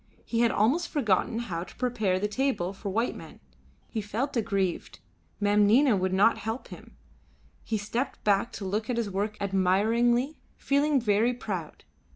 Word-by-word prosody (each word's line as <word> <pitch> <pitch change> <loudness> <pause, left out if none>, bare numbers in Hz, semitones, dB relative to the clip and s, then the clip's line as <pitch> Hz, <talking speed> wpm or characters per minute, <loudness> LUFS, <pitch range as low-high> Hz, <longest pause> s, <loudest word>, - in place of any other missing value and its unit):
He 230 - -1
had 235 0 +4
almost 245 +12 +1
forgotten 225 - +1
how 180 -8 -3
to 175 - -13
prepare 220 -7 0
the 210 - 0
table 210 -5 -1
for 200 +1 -6
white 225 +5 0
men. - - -11 0.5
He 220 - -3
felt 225 +8 -3
aggrieved; 200 -6 -1 0.4
Mem 205 0 +3
Nina 250 +2 +5
would 185 -1 0
not 200 +5 +4
help 225 +3 -5
him. - - -12 0.7
He 220 - -1
stepped 230 +6 -3
back 205 +3 +2
to 200 - -6
look 210 +4 -2
at 245 - 0
his 225 -4 -1
work 205 +2 -2
admiringly, 220 +8 +2 0.2
feeling 285 0 +2
very 225 +2 +2
proud. 190 -9 -6
215 Hz, 165 wpm, -28 LUFS, 200-240 Hz, 0.7 s, Nina